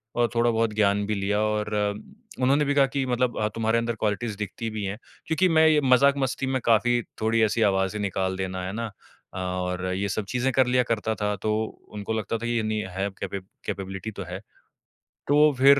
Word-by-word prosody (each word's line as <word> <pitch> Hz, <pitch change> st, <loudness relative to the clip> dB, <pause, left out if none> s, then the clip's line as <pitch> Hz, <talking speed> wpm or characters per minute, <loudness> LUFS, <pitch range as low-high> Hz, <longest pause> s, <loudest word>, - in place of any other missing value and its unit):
और 120 Hz, 0 st, +3 dB
थोड़ा-बहुत 115 Hz, -2 st, +2 dB
ज्ञान 100 Hz, -1 st, +2 dB
भी 110 Hz, -, 0 dB
लिया, 100 Hz, +1 st, 0 dB
और 105 Hz, 0 st, 0 dB, 0.7 s
उन्होंने 140 Hz, +3 st, +3 dB
भी 145 Hz, -, +1 dB
कहा 140 Hz, -1 st, +6 dB
कि 135 Hz, -1 st, +1 dB
मतलब 125 Hz, -1 st, 0 dB
अ, 105 Hz, -, +2 dB
"तुम्हारे 115 Hz, 0 st, +1 dB
अंदर 115 Hz, -1 st, -1 dB
क्वालिटीज़ 105 Hz, +1 st, -1 dB
दिखती 105 Hz, +3 st, -4 dB
भी 110 Hz, -2 st, -4 dB
हैं।" 100 Hz, +2 st, -3 dB, 0.3 s
क्योंकि 180 Hz, +3 st, +2 dB
मैं 160 Hz, -1 st, +5 dB
ये 150 Hz, -1 st, +4 dB
मज़ाक-मस्ती 135 Hz, 0 st, +3 dB
में 130 Hz, 0 st, 0 dB
काफ़ी 120 Hz, +1 st, +3 dB, 0.2 s
थोड़ी 110 Hz, +1 st, +2 dB
ऐसी 110 Hz, +2 st, +1 dB
आवाज़ें 95 Hz, +2 st, 0 dB
निकाल 95 Hz, -1 st, -1 dB
देना, 95 Hz, -1 st, -3 dB
है 95 Hz, -, -4 dB
ना 115 Hz, +1 st, -3 dB, 0.5 s
अ, -, -, -7 dB
और 90 Hz, 0 st, -2 dB
ये 100 Hz, +1 st, -1 dB
सब 100 Hz, +2 st, -2 dB
चीज़ें 125 Hz, +1 st, 0 dB
कर 130 Hz, -2 st, +4 dB
लिया 125 Hz, 0 st, +3 dB
करता 110 Hz, -1 st, -1 dB
था, 105 Hz, 0 st, -1 dB
तो 105 Hz, +2 st, -1 dB, 0.4 s
उनको 105 Hz, +1 st, -4 dB
लगता 110 Hz, +1 st, -2 dB
था 120 Hz, -, -6 dB
ये 120 Hz, -1 st, +1 dB
नहीं 110 Hz, 0 st, -1 dB, 0.2 s
है 100 Hz, +1 st, 0 dB
कैपे 100 Hz, -, -3 dB, 0.3 s
कैपेबिलिटी 95 Hz, +2 st, -4 dB
तो 100 Hz, -1 st, -6 dB
है। 90 Hz, +2 st, -5 dB, 0.9 s
तो 150 Hz, +1 st, +5 dB
फिर 140 Hz, +1 st, +7 dB
110 Hz, 200 wpm, -25 LUFS, 100-125 Hz, 0.9 s, फिर